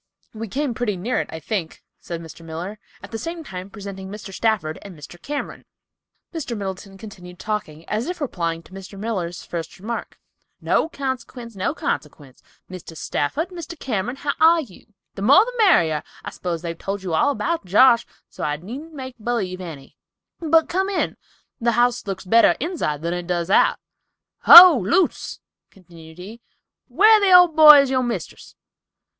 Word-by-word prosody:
"We 225 0 -6
came 275 +4 -2
pretty 220 -4 -2
near 225 +8 -2
it, - - -8
I 160 - -7
think," 175 -3 -5 0.2
said 170 -1 -7
Mr. 165 +1 -12
Miller, 170 +6 -7 0.2
at - - -11
the 225 - -5
same 335 +3 -6
time 185 -6 -8
presenting 195 -2 -9
Mr. 205 -1 -9
Stafford 195 -8 -1
and 190 -5 -12
Mr. 170 +4 -13
Cameron. 290 +5 -6 0.7
Mr. 275 -8 -5
Middleton 195 0 -7
continued 180 -4 -12
talking, 170 -7 -5
as 215 +4 -2
if 360 0 -5
replying 170 - -3
to - - -20
Mr. 195 +1 -10
Miller's 190 -5 -4
first 165 -2 -6
remark. 230 +5 -6 0.4
"No 320 - 0
consequence, 250 -5 -6
no 190 - -2
consequence, 145 -3 -5 0.3
Mr. 180 -3 -10
Stafford, 290 - -2
Mr. 340 -2 -9
Cameron, 240 -2 -3
how 285 +1 -2
are 330 +1 +5
you? 215 - -14 0.3
The - - -8
more 280 - +6
the - - -7
merrier. 165 - +3 0.2
I - - -5
s'pose 170 -2 -5
they've 170 -1 -4
told 195 +3 -5
you 180 -3 -4
all 160 - +2
about 330 - -2
Josh, 235 +5 +4 0.2
so - - -9
I 150 0 -1
needn't 265 - -9
make 260 -3 -9
b'lieve 205 -5 -3
any—but 185 - -3
come 380 +2 -1
in—the 235 -10 -4
house 240 -2 +1
looks 195 0 -5
better 230 +5 +4
inside 260 - -3
than 170 +1 -2
it 175 -1 -5
does 175 0 -2
out." - - +4 0.7
"Ho, 345 -6 +11
Luce," 340 - 0 0.3
continued 165 -3 -16
he, 210 +6 -11 0.5
"where 425 - +5
the 395 -2 +3
old 355 -3 +7
boy 300 -2 +9
is 275 -1 -2
your 260 -1 +1
mistress? 240 -2 -6
210 Hz, 170 wpm, -21 LUFS, 180-275 Hz, 0.7 s, Ho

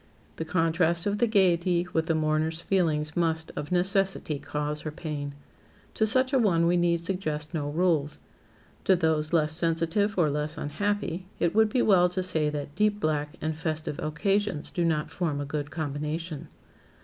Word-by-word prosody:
The 160 - -3
contrast 165 0 +1
of 205 0 0
the 240 - +3
gaiety 180 -4 +3
with 160 0 +1
the 165 - +2
mourner's 155 +1 0
feelings 160 -4 0
must, 160 -2 0
of 150 - -5
necessity, 190 -4 +1
cause 150 +1 -3
her 155 - -4
pain. 150 -2 -5 0.6
To 220 - +2
such 260 +4 +2
a 265 - +4
one 175 -7 +3
we 175 +1 +3
need 170 -1 +2
suggest 165 -4 -2
no 145 -3 -2
rules. 155 -2 +1 0.7
To 190 - +5
those 160 -3 +1
less 155 -2 +2
sensitive 165 +5 0
or 160 -5 +3
less 150 +2 -2
unhappy, 190 +3 -2
it 170 - +1
would 220 0 +4
be 245 +3 +1
well 180 -3 +5
to 185 +1 -2
say 160 -4 +1
that 145 -1 -5
deep 210 +3 +1
black 150 -4 -1
and 155 0 -2
festive 155 -2 -3
occasions 195 +2 -1
do 175 - -1
not 155 -2 0
form 160 -6 -2
a 145 - -3
good 145 0 -4
combination. 155 +1 -4
165 Hz, 175 wpm, -27 LUFS, 150-185 Hz, 0.7 s, To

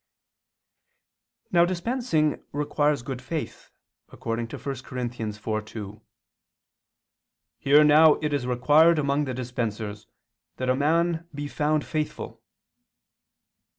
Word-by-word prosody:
Now 170 -1 +5
dispensing 175 - 0
requires 145 -1 0
good 130 0 -5
faith, 155 +4 -6 0.4
according 115 0 -4
to - - -7
1 - - -16 0.2
Cor. 130 - -9
4:2, 110 -3 -5 1.6
"Here 145 +2 +5
now 150 +1 +7
it 150 -1 -3
is 130 -3 -1
required 150 +7 +4
among 145 0 +1
the 130 -2 -4
dispensers 110 -4 -4 0.5
that 130 0 -2
a - - +2
man 165 +4 +1
be 145 0 -4
found 150 0 0
faithful." 155 -1 -4
145 Hz, 105 wpm, -25 LUFS, 120-155 Hz, 1.6 s, now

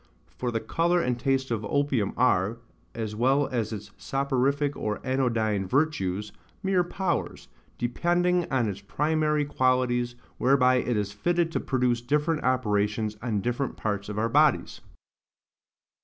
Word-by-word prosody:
For 125 - -2
the 115 -1 -1
colour 170 +10 +1
and 125 -6 -1
taste 135 0 0
of 110 -2 -1
opium 130 -3 0
are, 115 -3 +2 0.4
as 110 -2 -4
well 135 +5 +3
as 115 -5 -2
its 105 -3 -7
soporific 140 +1 0
or 105 -1 -3
anodyne 115 -7 0
virtues, 105 -7 0 0.3
mere 190 -2 +2
powers, 175 -1 -3 0.3
depending 175 - +1
on 130 -4 +2
its 100 -1 -4
primary 150 +6 0
qualities, 125 -3 +1 0.2
whereby 130 -1 +4
it 120 -2 0
is 100 -1 -1
fitted 170 +8 0
to - - -1
produce 125 -3 0
different 150 +5 0
operations 105 -3 0
on 110 -4 -1
different 120 +4 -2
parts 100 -1 -3
of 105 - -5
our 110 +2 +1
bodies. 145 +3 +2
125 Hz, 140 wpm, -27 LUFS, 110-145 Hz, 0.4 s, whereby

